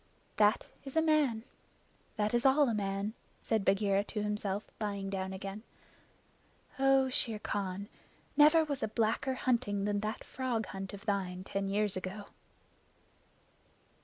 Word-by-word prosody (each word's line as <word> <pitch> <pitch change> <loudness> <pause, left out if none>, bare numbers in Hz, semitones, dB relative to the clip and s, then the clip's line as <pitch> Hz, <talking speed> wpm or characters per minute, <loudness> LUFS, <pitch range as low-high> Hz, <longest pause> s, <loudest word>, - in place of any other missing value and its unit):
"That 210 +1 +4 0.2
is 275 +2 -5
a - - +6
man. 295 -8 +2 0.7
That 210 0 0
is 240 0 +2
all 275 +2 +5
a 235 - +1
man," 200 0 -1 0.3
said 220 -3 +1
Bagheera 195 0 +3
to 210 -1 -3
himself, 210 -1 -1 0.2
lying 200 -2 -3
down 190 -1 -2
again. 195 +2 -6 1.2
"Oh, 270 0 +5
Shere 230 -3 -1
Khan, 200 -1 -3 0.5
never 305 +2 +7
was 285 -3 -3
a - - +1
blacker 230 +4 0
hunting 235 -6 0
than 205 0 +1
that 215 +2 -3
frog 245 -4 -2
hunt 195 0 -6
of 200 - -13
thine 185 -3 -1
ten 195 0 -2
years 205 0 +1
ago!" 190 +2 -5
210 Hz, 140 wpm, -32 LUFS, 195-245 Hz, 1.2 s, never